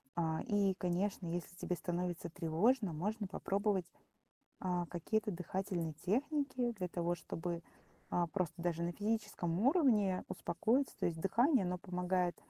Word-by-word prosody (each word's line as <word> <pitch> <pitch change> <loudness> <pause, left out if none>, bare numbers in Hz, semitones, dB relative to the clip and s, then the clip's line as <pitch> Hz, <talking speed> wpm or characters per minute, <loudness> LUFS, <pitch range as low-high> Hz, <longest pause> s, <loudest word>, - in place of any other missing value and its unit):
А, 160 -2 0
и, 205 -4 +3
конечно, 185 +2 -1
если 175 +1 -3
тебе 180 - -2
становится 175 0 -2
тревожно, 175 +5 +2
можно 205 +6 -2
попробовать, 195 -2 0 0.7
а, 180 -2 0
какие-то 215 +6 -1
дыхательные 180 -1 -2
техники 250 - 0
для 185 -4 -3
того, 175 0 0
чтобы, 170 0 -4 0.5
а, 175 -1 +2
просто 175 -2 -2
даже 170 -1 0
на 175 +1 0
физическом 205 -5 -1
уровне 230 - +4
успокоиться. 230 +10 +1
То - - +1
есть 165 -2 -2
дыхание, 240 - +4
оно 180 0 -1
помогает, 180 -1 0
180 Hz, 135 wpm, -36 LUFS, 175-210 Hz, 0.7 s, уровне